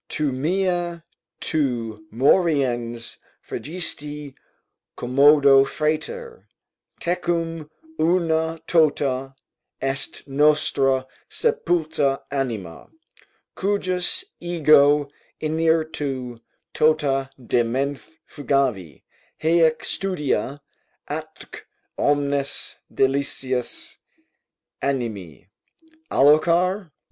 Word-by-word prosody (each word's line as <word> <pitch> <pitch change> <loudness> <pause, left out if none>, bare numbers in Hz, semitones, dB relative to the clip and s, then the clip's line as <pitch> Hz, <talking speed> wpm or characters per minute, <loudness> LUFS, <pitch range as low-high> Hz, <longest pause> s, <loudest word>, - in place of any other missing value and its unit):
Tu 150 -3 -1
mea, 175 +3 -1 0.4
tu 115 -8 -2
moriens 125 - +1 0.3
fregisti 150 -3 -5 0.6
commoda, 140 +2 +6
frater; 305 - -3 0.5
Tecum 165 -3 -2 0.3
una 165 -1 +1
tota 140 -5 +1 0.4
est 135 +2 -3
nostra 135 -2 +2 0.2
sepulta 160 - 0
anima 115 -12 -4 0.6
Cujus 195 - 0
ego 150 -4 +4 0.3
interitu 155 -6 -1 0.3
tota 145 -4 +2
de 120 -1 +1
menthe 140 +6 -3
fugavi 130 - -1 0.4
Haec 160 0 +3
studia, 150 -6 -2 0.4
atque - - -7 0.4
omnes 140 -1 0
delicias 135 -2 0 0.8
animi. 110 - -3 0.6
Alloquar? 170 +6 +3
145 Hz, 60 wpm, -23 LUFS, 135-165 Hz, 0.8 s, commoda